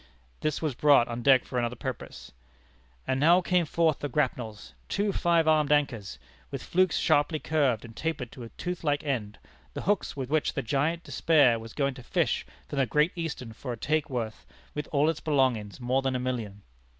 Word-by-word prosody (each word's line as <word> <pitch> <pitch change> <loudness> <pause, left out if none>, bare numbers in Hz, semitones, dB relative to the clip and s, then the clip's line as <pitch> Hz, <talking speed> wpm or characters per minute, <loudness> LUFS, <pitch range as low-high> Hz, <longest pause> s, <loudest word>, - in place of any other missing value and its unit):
This 155 +1 -2
was 155 -4 0
brought 140 -2 +5
on 120 0 -4
deck 130 0 +5
for 125 - -2
another 120 0 -1
purpose. 125 +1 -7 0.7
"And 130 - 0
now 170 +5 +6
came 180 -2 +1
forth 160 -1 +2
the 145 - -3
grapnels, 115 - -2 0.2
two 205 0 0
five 170 -3 +2
armed 155 -2 +3
anchors, 130 -9 0 0.3
with - - -6
flukes 185 -1 +2
sharply 145 +2 +2
curved 140 -8 0
and 115 -1 -12
tapered 155 -7 -3
to 130 - -11
a 115 - -7
tooth 180 +6 -5
like 145 -2 0
end 115 -8 -2 0.4
the - - -4
hooks 205 -5 0
with 130 -2 -3
which 155 -1 +1
the 135 - -1
Giant 150 +8 0
Despair 140 -8 +3
was 115 0 -10
going 140 -2 0
to 125 - -11
fish 125 - 0 0.2
from 140 - -3
the 135 - +2
Great 150 +6 +2
Eastern 150 -9 -5
for 125 +2 -5
a - - -7
take 155 +5 0
worth, 115 -4 -4 0.3
with 150 -1 -4
all 145 +1 +3
its 160 -1 0
belongings, 130 -9 0
more 130 +2 +1
than 135 -1 -1
a - - 0
million." 115 -6 -4
140 Hz, 200 wpm, -28 LUFS, 120-155 Hz, 0.7 s, now